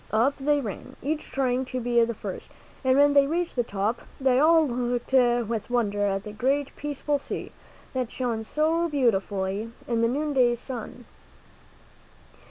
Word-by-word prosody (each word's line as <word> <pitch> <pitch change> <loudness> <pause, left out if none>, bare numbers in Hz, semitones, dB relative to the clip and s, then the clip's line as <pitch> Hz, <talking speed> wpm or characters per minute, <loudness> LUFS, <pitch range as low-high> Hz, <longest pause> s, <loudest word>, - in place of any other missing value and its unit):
Up 235 +6 +3
they 290 +2 +2
ran, 210 -7 -7
each 305 +2 -2
trying 260 -1 0
to 255 0 -4
be 240 -1 +3
the 230 0 -1
first, - - -6 0.3
and 260 0 +3
when 285 0 +5
they 280 -1 +5
reached 340 +3 -1
the 245 - +2
top, 210 +1 -2 0.2
they 260 -1 +3
all 320 +1 +5
looked 245 0 -2
with 240 -4 +2
wonder 205 -4 +1
at 195 0 -1
the 210 - -7
great, 270 +6 -1
peaceful 290 0 -2
sea, - - -5 0.4
that 255 -3 -2
shone 235 -3 -2
so 320 +7 +1
beautifully 205 -5 0 0.2
in 235 -1 0
the 230 - +4
noonday 260 -2 +2
sun. 245 0 -7
250 Hz, 160 wpm, -26 LUFS, 230-280 Hz, 0.4 s, when